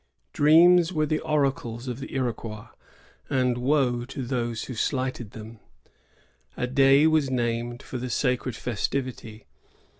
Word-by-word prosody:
Dreams 170 Hz, +3 st, +6 dB
were 155 Hz, -3 st, 0 dB
the 155 Hz, +1 st, -1 dB
oracles 135 Hz, -6 st, -1 dB
of 125 Hz, 0 st, -4 dB
the 135 Hz, -, -8 dB
Iroquois, 115 Hz, -4 st, -4 dB, 0.6 s
and 125 Hz, -2 st, +1 dB
woe 125 Hz, -2 st, +1 dB
to 135 Hz, +1 st, -6 dB
those 120 Hz, -2 st, -2 dB
who 130 Hz, -, -6 dB
slighted 130 Hz, -1 st, -2 dB
them. 110 Hz, 0 st, -10 dB, 1.0 s
A -, -, -1 dB
day 135 Hz, +3 st, +4 dB
was 155 Hz, -3 st, +3 dB
named 120 Hz, 0 st, -2 dB
for 125 Hz, -, -6 dB
the 125 Hz, +1 st, -4 dB
sacred 125 Hz, -1 st, -1 dB
festivity. 120 Hz, -1 st, -4 dB
125 Hz, 130 wpm, -25 LUFS, 120-140 Hz, 1.0 s, Dreams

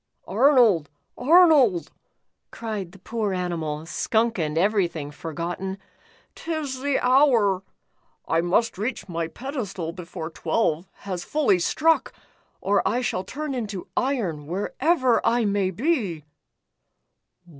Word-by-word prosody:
"Arnold, 225 Hz, -, +4 dB, 0.3 s
Arnold," 285 Hz, -, +5 dB, 0.6 s
cried 215 Hz, -6 st, -5 dB
the 195 Hz, -, -15 dB
poor 210 Hz, +1 st, -3 dB
animal, 165 Hz, -4 st, -3 dB
skunk 225 Hz, +6 st, 0 dB
and 155 Hz, -1 st, -1 dB
everything 175 Hz, -6 st, +1 dB
forgotten, 170 Hz, +5 st, -5 dB, 0.6 s
"'tis 310 Hz, -5 st, -4 dB
the 285 Hz, -1 st, +1 dB
hour. 250 Hz, -8 st, +4 dB, 0.7 s
I 165 Hz, -, +2 dB
must 185 Hz, +4 st, +1 dB
reach 220 Hz, -2 st, -3 dB
my 170 Hz, -2 st, -2 dB
pedestal 205 Hz, -, -5 dB
before 170 Hz, -2 st, -7 dB
twelve 170 Hz, -2 st, 0 dB, 0.2 s
has 185 Hz, -3 st, -4 dB
fully 275 Hz, -12 st, +2 dB
struck, 320 Hz, -, +2 dB, 0.5 s
or 200 Hz, +1 st, +2 dB
I 225 Hz, +6 st, 0 dB
shall 205 Hz, -6 st, -1 dB
turn 290 Hz, +8 st, -5 dB
into 210 Hz, -7 st, -5 dB
iron, 195 Hz, -, -1 dB
wherever 255 Hz, -, +1 dB
I 235 Hz, 0 st, +2 dB
may 200 Hz, -2 st, +1 dB
be." 200 Hz, -, -1 dB
200 Hz, 115 wpm, -24 LUFS, 175-255 Hz, 0.7 s, Arnold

